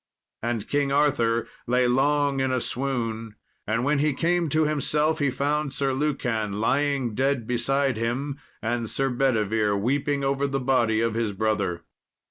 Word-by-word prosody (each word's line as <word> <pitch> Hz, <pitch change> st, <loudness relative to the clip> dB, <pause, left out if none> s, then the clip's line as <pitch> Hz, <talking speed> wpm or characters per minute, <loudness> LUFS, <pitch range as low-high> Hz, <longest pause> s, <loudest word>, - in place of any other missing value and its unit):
And 115 Hz, -2 st, -2 dB
King 145 Hz, -1 st, 0 dB
Arthur 135 Hz, -6 st, +2 dB, 0.2 s
lay 125 Hz, +1 st, +3 dB
long 140 Hz, +2 st, +2 dB
in 130 Hz, 0 st, +1 dB
a 130 Hz, -, +1 dB
swoon, 115 Hz, -4 st, -2 dB, 0.3 s
and 115 Hz, +3 st, 0 dB
when 145 Hz, +1 st, +2 dB
he 150 Hz, 0 st, +2 dB
came 170 Hz, +3 st, +1 dB
to 155 Hz, +2 st, +2 dB
himself, 150 Hz, +1 st, +1 dB
he 145 Hz, -2 st, +2 dB
found 145 Hz, +1 st, -1 dB
Sir 135 Hz, -1 st, 0 dB
Lucan 125 Hz, -7 st, -1 dB
lying 135 Hz, 0 st, +1 dB
dead 130 Hz, 0 st, 0 dB
beside 125 Hz, +2 st, 0 dB
him, 135 Hz, +5 st, -2 dB, 0.2 s
and 115 Hz, 0 st, -1 dB
Sir 135 Hz, -1 st, 0 dB
Bedivere 110 Hz, -5 st, +1 dB
weeping 140 Hz, +6 st, 0 dB
over 135 Hz, +1 st, +1 dB
the 135 Hz, 0 st, -1 dB
body 120 Hz, -4 st, +2 dB
of 115 Hz, -1 st, 0 dB
his 115 Hz, -2 st, -1 dB
brother. 100 Hz, -5 st, -1 dB
130 Hz, 155 wpm, -25 LUFS, 115-140 Hz, 0.3 s, lay